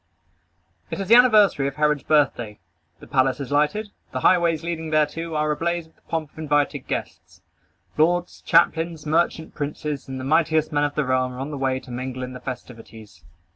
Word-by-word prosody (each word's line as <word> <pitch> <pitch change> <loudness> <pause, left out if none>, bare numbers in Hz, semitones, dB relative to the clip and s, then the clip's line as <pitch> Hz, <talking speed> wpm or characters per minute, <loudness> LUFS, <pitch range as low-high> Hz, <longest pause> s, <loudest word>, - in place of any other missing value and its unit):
It - - -5
is 195 - -4
the - - +7
anniversary 215 - +6
of 140 - -5
Herod's 150 -1 +1
birthday. 120 -8 +1 0.4
The - - -13
palace 130 -1 +1
is 140 -1 -6
lighted. 175 +9 +1 0.2
The - - -2
highways 170 -3 +3
leading 165 -1 -4
thereto 155 +2 0
are 150 0 +1
ablaze 170 +2 -1
with 160 - -25
the - - -32
pomp 160 -3 -3
of - - -15
invited 145 -2 0
guests. - - -6 0.6
Lords, 175 +3 +1
captains, 165 -1 +2
merchant 160 +1 0
princes, 150 -1 -4
and 130 -1 -6
the - - -6
mightiest 155 +2 +2
men 145 -1 +2
of 145 - -3
the 150 - 0
realm 130 0 0
are 125 - -8
on 140 +3 -4
the - - -4
way 130 -1 0
to 130 - -13
mingle 130 +1 -5
in 125 0 -6
the 125 - -8
festivities. 115 -5 -10
150 Hz, 190 wpm, -23 LUFS, 130-165 Hz, 0.6 s, the